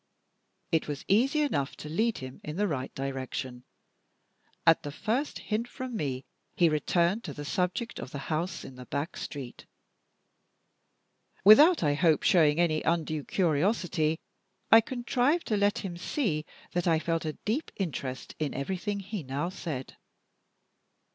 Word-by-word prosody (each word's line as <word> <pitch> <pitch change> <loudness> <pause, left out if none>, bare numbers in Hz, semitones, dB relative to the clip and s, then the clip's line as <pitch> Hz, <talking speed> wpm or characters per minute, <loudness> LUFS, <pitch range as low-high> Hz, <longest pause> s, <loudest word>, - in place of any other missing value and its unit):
It 160 - +2
was 145 -2 -5
easy 265 +10 +3
enough 140 - 0
to - - -9
lead 220 +9 +1
him 130 0 -8
in 150 - -5
the 205 +3 +1
right 135 -7 -3
direction. 130 -2 -4 1.0
At 165 -1 +6
the 145 - -5
first 240 - -1
hint 225 +2 -2
from 255 0 -6
me, 135 -8 -2 0.3
he 170 -2 +5
returned 170 +7 +1
to - - -6
the 145 - -6
subject 180 +9 -1
of - - -6
the 140 - -6 0.2
house 170 +4 -2
in 130 - -10
the 125 - -10
back 145 +5 -3
street. 135 -4 -7 1.8
Without, 295 - +8
I 145 -2 +3
hope, 160 0 +3
showing 155 -3 +4
any 155 -3 +2
undue 155 -3 0
curiosity, 170 -1 +1 0.5
I 225 - +10
contrived 255 +6 0
to 215 - +2
let 205 0 +2
him 175 -2 -5
see 175 - -1 0.2
that 175 0 -1
I 165 -1 +4
felt 165 +1 -1
a 155 -1 -2
deep 250 +10 -1
interest 140 -8 -4
in 150 -3 -2
everything 190 +7 -2
he 200 0 -5
now 140 +5 -2
said. 155 -8 -6
170 Hz, 150 wpm, -29 LUFS, 145-210 Hz, 1.8 s, I